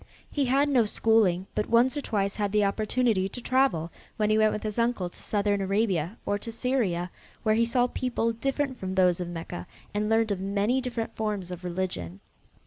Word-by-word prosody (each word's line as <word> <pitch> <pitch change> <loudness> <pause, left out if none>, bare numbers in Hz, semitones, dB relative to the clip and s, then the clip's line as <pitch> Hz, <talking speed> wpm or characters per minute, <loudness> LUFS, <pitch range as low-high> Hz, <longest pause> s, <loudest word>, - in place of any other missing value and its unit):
He 285 -2 +1
had 275 +3 +3
no 255 -5 +3
schooling, 205 -4 +2
but 210 - -2
once 240 +4 +4
or 290 - -2
twice 200 -5 -1
had 205 -2 -1
the 210 0 +3
opportunity 215 -1 +1
to 245 - -7
travel, 245 -11 +1 0.3
when 215 0 +2
he 215 - +4
went 215 0 +4
with 210 - -4
his 215 +1 -3
uncle 230 -7 0
to - - -14
southern 205 -1 0
Arabia 195 -2 0
and 205 0 -1
to 230 - -5
Syria, 220 -8 -1 0.3
where 215 - +3
he 230 +1 +3
saw 245 +1 +3
people 245 -2 -1
different 270 +2 -2
from 190 0 -4
those 180 -2 +4
of 175 - -3
Mecca 165 - -6 0.3
and 210 +1 0
learned 225 -1 +2
of 195 - -1
many 200 +6 +1
different 240 -3 -4
forms 210 -5 -2
of 180 0 -7
religion. 170 - -4
210 Hz, 200 wpm, -27 LUFS, 190-235 Hz, 0.3 s, once